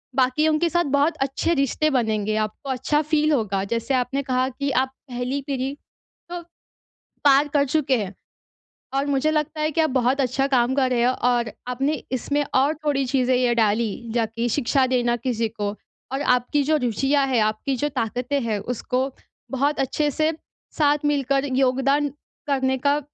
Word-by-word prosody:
बाकियों 300 +4 +2
के 340 +1 +2
साथ 345 +1 +1
बहुत 295 +4 +2
अच्छे 270 +5 0
रिश्ते 280 +1 +1
बनेंगे 215 -2 -1
आपको 270 +6 -12
अच्छा 265 +3 +1
फील 305 0 +1
होगा। 200 -7 0
जैसे 235 +3 -1
आपने 260 +2 0
कहा 255 -1 +1
कि 280 +2 -3
आप 260 +1 +1 0.2
पहली 250 +3 -2
पीढ़ी 270 -1 -2 0.6
तो 350 0 -4 0.9
पार 280 +1 +6
कर 285 -1 +3
चुके 270 -2 +1
हैं। 195 0 -7 0.8
और 275 +1 +1
मुझे 285 +2 +1
लगता 310 0 -1
है 305 0 +1
कि 325 - +1
आप 315 -2 +2
बहुत 255 +1 +1
अच्छा 270 +1 +1
काम 250 0 +3
कर 260 -2 +2
रहे 240 -2 +2
हो 250 - +3 0.2
और 240 -2 +1 0.2
आपने 265 +4 0 0.2
इसमें 285 +3 0
और 280 +4 +3
थोड़ी 280 -2 +1
चीज़ें 255 0 +1
ये 245 -1 +2
डाली, 225 +1 0
जाकि 230 0 0
शिक्षा 265 +1 +2
देना 245 -2 +1
किसी 235 -2 -1
को 210 -2 -3 0.4
और 270 - -1
आपकी 250 +4 0
जो 310 +2 +2
रुचियाँ 270 +4 +1
है, 255 -2 +2
आपकी 215 +5 0
जो 290 +4 0
ताकतें 250 +2 -2
हैं। 220 -3 -1
उसको, 250 +4 -2 0.4
बहुत 280 +2 0
अच्छे 295 +3 0
से 310 +3 +1 0.5
साथ 295 -1 +2
मिलकर 275 0 0
योगदान 270 +2 +2 0.4
करने 265 -1 +1
का 285 +3 +2
265 Hz, 170 wpm, -23 LUFS, 245-285 Hz, 0.9 s, पार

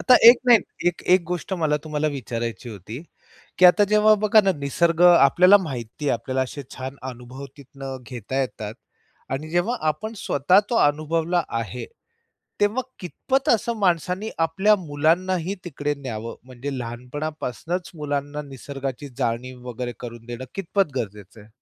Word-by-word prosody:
आता 255 - +6
एक 240 - +10
नाही. 240 -2 +8 0.3
एक-एक 180 +1 +2
गोष्ट 180 +2 -4
मला 150 -1 +2
तुम्हाला 155 0 -1
विचारायची 120 -3 -4
होती, 110 - -8 0.6
की 185 - +5
आता 205 +4 +6
जेव्हा 215 +1 +5
बघा 215 +1 +6
ना 195 - +3
निसर्ग 165 +4 +1
आपल्याला 175 +4 +7
माहिती 130 -4 -6
आहे, - - +3
आपल्याला 130 0 -2
असे 140 +2 -6
छान 130 +1 -6
अनुभव 125 +3 -10
तिथनं 135 -1 -8
घेता 125 +2 -3
येतात. 110 -5 -4 0.6
आणि 145 +4 -3
जेव्हा 175 +9 +1
आपण 185 +9 -2
स्वतः 180 +3 +3
तो 240 - 0
अनुभवला 165 +3 0 0.2
आहे. 115 +2 -5 0.7
तेव्हा 210 +5 +2 0.2
कितपत 270 - -2
असं 235 -1 +2
माणसाने 185 +2 0
आपल्या 180 +6 +3
मुलांनाही 175 +3 0
तिकडे 145 -3 -2
न्यावं? 115 -5 -6
म्हणजे 130 +2 -6
लहानपणापासूनच 145 +7 -5
मुलांना 145 -1 -3
निसर्गाची 135 0 -6
जाणीव 125 +1 -3
वगैरे 120 0 -4
करून 120 -1 -8
देणं 120 +1 -6
कितपत 195 -4 0
गरजेचं 105 -2 -6
आहे? 105 - -16
145 Hz, 140 wpm, -23 LUFS, 125-180 Hz, 0.7 s, एक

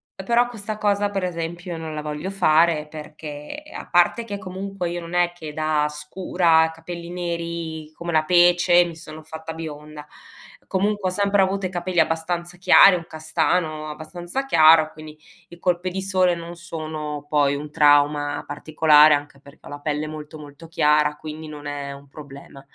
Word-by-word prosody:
Eh 190 - -8
però 240 +3 +2
questa 215 -2 -6
cosa 205 -1 +1
per 195 -2 -3
esempio 175 0 -4
non 160 -1 -6
la 150 - -4
voglio 150 +4 -5
fare, 160 -4 +3
perché 150 - -9
a - - -8
parte 175 +7 +3
che 205 -2 -5
comunque 190 -1 -5
io 175 0 -4
non 170 0 -9
è 175 0 +2
che 160 -4 -9
da 155 -1 0
scura, 160 +2 +1
capelli 170 +1 -8
neri 170 -3 -5
come 170 +1 -5
la 155 -1 +3
pece 175 +1 +5
mi 170 -2 -7
sono 155 -1 -11
fatta 160 +1 -8
bionda, 150 -2 -8 0.6
comunque 200 0 0
ho - - -5
sempre 200 0 +2
avuto 190 0 0
i - - -9
capelli 175 -1 -2
abbastanza 170 +2 -2
chiari, 190 +1 +7
un 165 - -8
castano 155 -1 -1
abbastanza 175 - -5
chiaro, 155 -7 +6
quindi 155 0 -12 0.3
i 175 - -14
colpi 180 0 0
di 190 +1 -4
sole 185 -2 +2
non 170 +1 -8
sono 155 -3 -6
poi 145 -2 +2
un 150 +1 -7
trauma 145 -1 +3
particolare 150 0 +4
anche 145 -1 -3
perché 140 +2 -18
ho - - -10
la 145 0 -7
pelle 150 +1 -2
molto, 155 0 -8
molto 150 +2 -12
chiara 150 -1 +2
quindi 155 +1 -8
non 150 -1 -10
è 145 -1 -5
un 140 0 -14
problema. 140 -1 -12
160 Hz, 175 wpm, -22 LUFS, 150-175 Hz, 0.6 s, chiari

